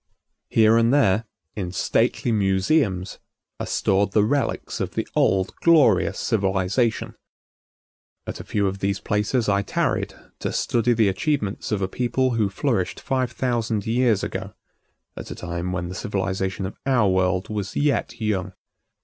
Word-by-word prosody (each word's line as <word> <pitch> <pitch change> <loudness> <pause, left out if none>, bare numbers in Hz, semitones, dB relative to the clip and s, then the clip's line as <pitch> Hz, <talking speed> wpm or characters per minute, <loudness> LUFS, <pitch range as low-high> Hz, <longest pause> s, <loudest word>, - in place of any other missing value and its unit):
Here 110 0 +5
and 115 +1 +3
there, 115 -6 +3 0.3
in 90 -4 -3
stately 115 - +1
museums, 95 - +1 0.4
are - - -4
stored 100 +1 +1
the 105 - +4
relics 140 +6 -1
of - - -3
the - - -2
old 95 0 +2
glorious 150 - +4
civilization. 100 +2 0 1.1
At - - -6
a - - -6
few 100 -1 -1
of 95 0 -2
these 100 0 -1
places 105 +4 0
I 100 -1 +2
tarried - - -1 0.2
to - - -2
study 120 +1 +1
the 110 -2 +3
achievements 105 0 -1
of 100 -2 0
a - - +1
people 125 +5 0
who 110 -4 +1
flourished 100 -3 -1
five 130 -2 -1
thousand 120 -4 -1
years 115 -2 +2
ago, - - -5 0.6
at - - -8
a - - -6
time 85 +1 -4
when 90 -1 -3
the 90 - -6
civilization 95 -1 -2
of 95 - -6
our 125 -6 +3
world 95 0 +1
was 105 -2 -4
yet 140 -5 0
young. 105 -5 -1
105 Hz, 150 wpm, -23 LUFS, 95-120 Hz, 1.1 s, Here